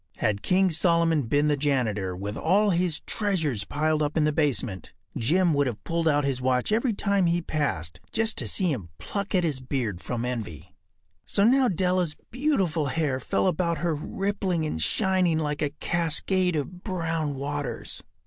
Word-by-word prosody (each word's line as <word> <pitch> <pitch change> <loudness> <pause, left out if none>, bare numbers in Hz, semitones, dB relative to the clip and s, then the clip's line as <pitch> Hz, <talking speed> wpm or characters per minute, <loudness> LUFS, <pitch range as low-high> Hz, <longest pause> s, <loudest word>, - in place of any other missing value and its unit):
Had 100 -1 0
King 185 - +3
Solomon 165 -4 +2
been 145 +5 +2
the 150 - +3
janitor, 115 -10 0
with 100 +3 -5
all 200 - +3
his 175 -2 0
treasures 160 - -1
piled 155 +1 0
up 150 +2 -1
in 155 - +3
the 150 - +3
basement, 125 - -1 0.2
Jim 170 +8 +2
would 140 -1 +2
have 115 -3 -5
pulled 165 0 -1
out 145 -1 +3
his 135 -2 -1
watch 125 +5 +1
every 230 +3 +2
time 200 -3 +1
he 170 +1 +2
passed, 135 - -2
just 225 0 +1
to - - -1
see 185 -4 +1
him 100 - -4
pluck 200 -1 -3
at 180 - +3
his 150 -6 0
beard 125 -8 -3
from 120 -1 -3
envy. 110 -11 -5 0.5
So 200 - +2
now 255 +4 +5
Della’s 180 -4 +1 0.2
beautiful 195 - +1
hair 140 -2 0
fell 130 - 0
about 170 -2 +1
her 170 -1 0
rippling 185 +1 -2
and 80 - -3
shining 185 - +2
like 150 -2 -2
a 150 - +1
cascade 175 +4 0
of 175 +5 -4
brown 165 -6 -2
waters. 145 0 -4
155 Hz, 175 wpm, -26 LUFS, 135-185 Hz, 0.5 s, now